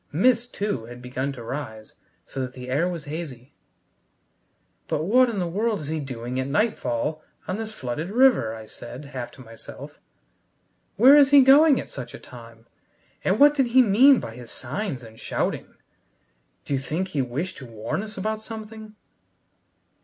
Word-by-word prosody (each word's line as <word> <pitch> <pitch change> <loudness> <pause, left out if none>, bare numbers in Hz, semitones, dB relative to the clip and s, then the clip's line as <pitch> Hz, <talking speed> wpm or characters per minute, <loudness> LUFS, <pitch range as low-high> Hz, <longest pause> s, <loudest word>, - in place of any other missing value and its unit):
Mist, 240 - +2
too, 200 - -3
had 120 +1 -10
begun 130 +2 -3
to 120 -3 -9
rise, 115 -4 -6 0.3
so 135 - -5
that 130 0 -4
the 125 -1 -8
air 165 +7 +1
was 170 -3 -6
hazy. 145 -5 -7 1.3
"But 150 - -1
what 250 +8 +4
in 225 - -4
the 180 - 0
world 210 +3 -1
is 145 - -6
he 160 0 -2
doing 125 -2 -5
at 130 - -2
nightfall 155 - -1 0.3
on 185 - -2
this 220 -1 -4
flooded 150 - -4
river?" 230 - +4
I 110 -1 -9
said, 120 +5 -10
half 130 -4 -6
to - - -13
myself. 115 -1 -11 1.0
"Where 260 +7 +8
is 285 -2 +7
he 285 -1 +8
going 280 +2 +6
at - - -6
such 125 -3 -8
a - - -10
time, 115 -2 -14 0.6
and 190 +3 +1
what 290 +1 +7
did 270 -4 +2
he 255 +2 +6
mean 250 +6 +6
by 115 - -7
his 120 -1 -11
signs 140 - -4
and 110 -1 -13
shouting? - - -3 0.9
D'you 140 -2 -1
think 165 +7 -3
he 150 -7 -1
wished 145 +10 -4
to 130 - -10
warn 110 - -4
us 215 -1 -9
about 215 +3 -2
something?" 220 -1 -9
155 Hz, 175 wpm, -24 LUFS, -, 1.3 s, Where